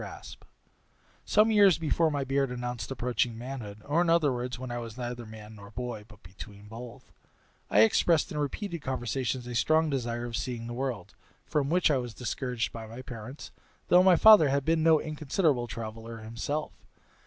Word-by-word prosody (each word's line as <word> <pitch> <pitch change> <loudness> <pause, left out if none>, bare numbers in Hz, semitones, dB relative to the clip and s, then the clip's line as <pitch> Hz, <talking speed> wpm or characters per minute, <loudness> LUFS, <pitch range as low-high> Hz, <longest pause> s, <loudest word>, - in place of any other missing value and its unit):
Raspe - - -10 0.8
Some 215 +1 +4
years 200 -6 +6
before 165 0 +1
my 145 -2 -1
beard 135 0 0
announced 125 -1 -5
approaching 125 -2 -1
manhood, 115 -4 -7
or, 150 +4 +2
in 175 - +1
other 160 -5 +3
words, 125 0 -4
when 125 0 -6
I 120 - -3
was 115 -1 -8
neither 120 -2 -5
man 110 0 -11
nor 100 -1 -12
boy, 115 -1 -6
but 105 -3 -18
between 100 +3 -12
both, 115 +2 -10 0.6
I 105 - +5
expressed 155 +8 +3
in 150 - -3
repeated 170 +4 -3
conversations 130 -1 -2
a 125 - -6
strong 155 +6 +2
desire 120 -3 -2
of 120 -1 -5
seeing 120 -2 -4
the 120 - -6
world, 120 -7 -4 0.3
from 145 -3 0
which 175 -1 +3
I 140 - +3
was 120 -3 -5
discouraged 125 0 -3
by 115 -1 -7
my 115 +4 -9
parents, 125 +3 -9 0.4
though 180 - +7
my 185 -1 +6
father 205 -6 +8
had 140 0 0
been 160 0 +2
no 160 -1 +5
inconsiderable 150 -4 0
traveller 115 0 -7
himself. 115 +7 -4
125 Hz, 180 wpm, -29 LUFS, 115-150 Hz, 0.8 s, father